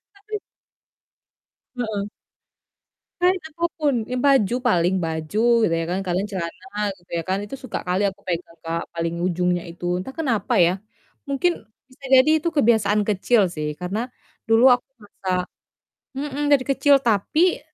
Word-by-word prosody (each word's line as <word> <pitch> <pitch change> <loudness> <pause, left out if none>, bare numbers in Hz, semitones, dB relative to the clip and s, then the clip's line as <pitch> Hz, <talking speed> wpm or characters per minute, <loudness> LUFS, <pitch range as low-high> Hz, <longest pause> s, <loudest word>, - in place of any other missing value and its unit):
Tapi 425 +1 -6 1.4
Heeh. 215 -4 -2 1.1
Kain 365 +1 +3
apapun, 320 -2 -1 0.2
ya - - -1
baju 245 -5 +4
paling, 180 -4 +3
baju 160 +5 -3 0.2
gitu 195 - +2
ya - - -2
kan, 185 - 0
kadang 180 +2 0
celana 190 +5 -6 0.2
gitu 175 - -28
ya 165 - -2
kan, 190 - +1
itu 240 - -7
suka 255 - -4
kali 180 +2 +1
aku 195 +1 -15
pegang 170 -1 -4
Kak, 165 0 -2
paling 165 0 -2
ujungnya 180 -1 0
itu. 175 +1 -9
Entah 190 +8 -6
kenapa 245 -4 0
ya, 170 - +3 0.6
mungkin 280 +6 +2 0.4
bisa 260 +2 -22
jadi 260 +3 +6
itu 335 - +2
kebiasaan 215 -5 +3
kecil 210 +3 +3
sih 150 -1 -3
karena 180 +4 -3 0.5
dulu 225 +1 +5
aku 245 - -11 0.2
merasa 185 -3 -3 0.7
mhm, 285 +1 -3
dari 270 -2 +4
kecil. 285 +1 +4
Tapi, 245 - +2
210 Hz, 145 wpm, -23 LUFS, 180-270 Hz, 1.4 s, jadi